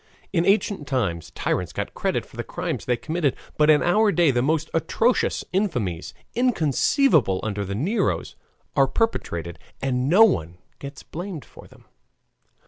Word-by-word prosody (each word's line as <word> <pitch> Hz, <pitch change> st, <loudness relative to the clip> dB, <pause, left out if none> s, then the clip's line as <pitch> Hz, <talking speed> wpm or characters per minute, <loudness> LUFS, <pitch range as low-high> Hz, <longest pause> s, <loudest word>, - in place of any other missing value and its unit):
In 170 Hz, -2 st, +2 dB
ancient 195 Hz, -6 st, +1 dB
times 100 Hz, -, -1 dB
tyrants -, -, -1 dB
got -, -, -4 dB
credit -, -, -1 dB
for -, -, -18 dB
the -, -, -4 dB
crimes -, -, -4 dB
they 125 Hz, -1 st, +1 dB
committed, 155 Hz, 0 st, -1 dB, 0.2 s
but 150 Hz, 0 st, +3 dB
in 150 Hz, -1 st, +5 dB
our 210 Hz, +4 st, +3 dB
day 175 Hz, -6 st, +3 dB
the 120 Hz, -1 st, +1 dB
most 160 Hz, +4 st, +1 dB
atrocious 225 Hz, +9 st, +1 dB
infamies, 120 Hz, -, -1 dB, 0.2 s
inconceivable 165 Hz, -, +2 dB
under 105 Hz, -2 st, -2 dB
the 100 Hz, 0 st, -4 dB
Neros, 190 Hz, -, -1 dB, 0.4 s
are 135 Hz, -1 st, +4 dB
perpetrated 85 Hz, -, -2 dB, 0.2 s
and 130 Hz, 0 st, -1 dB
no 195 Hz, +7 st, +7 dB
one 85 Hz, -, +1 dB, 0.2 s
gets 140 Hz, 0 st, -9 dB
blamed 175 Hz, -2 st, -7 dB
for -, -, -15 dB
them. -, -, -20 dB
150 Hz, 150 wpm, -24 LUFS, 120-195 Hz, 0.4 s, no